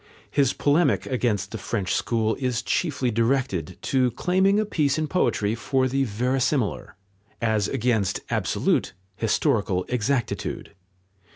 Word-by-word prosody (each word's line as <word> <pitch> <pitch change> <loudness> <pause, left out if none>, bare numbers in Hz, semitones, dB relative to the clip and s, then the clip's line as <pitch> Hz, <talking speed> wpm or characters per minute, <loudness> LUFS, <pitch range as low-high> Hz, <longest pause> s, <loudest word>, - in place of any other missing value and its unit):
His 140 -2 +2
polemic 150 +4 +2
against 110 -7 -1
the 110 - -5
French 100 -2 -2
school 110 -2 0
is 125 -3 -1
chiefly 135 -7 0
directed 115 - 0
to 130 -2 +2
claiming 190 - +2
a 215 - +1
place 145 -8 +1
in 155 0 -1
poetry 110 - +1
for 130 +3 0
the 135 +1 0
verisimilar, 125 -2 -1 0.4
as 110 -3 +1
against 110 -5 0
absolute - - 0 0.2
historical 90 0 +1
exactitude. 125 0 -2
125 Hz, 120 wpm, -24 LUFS, 110-140 Hz, 0.4 s, His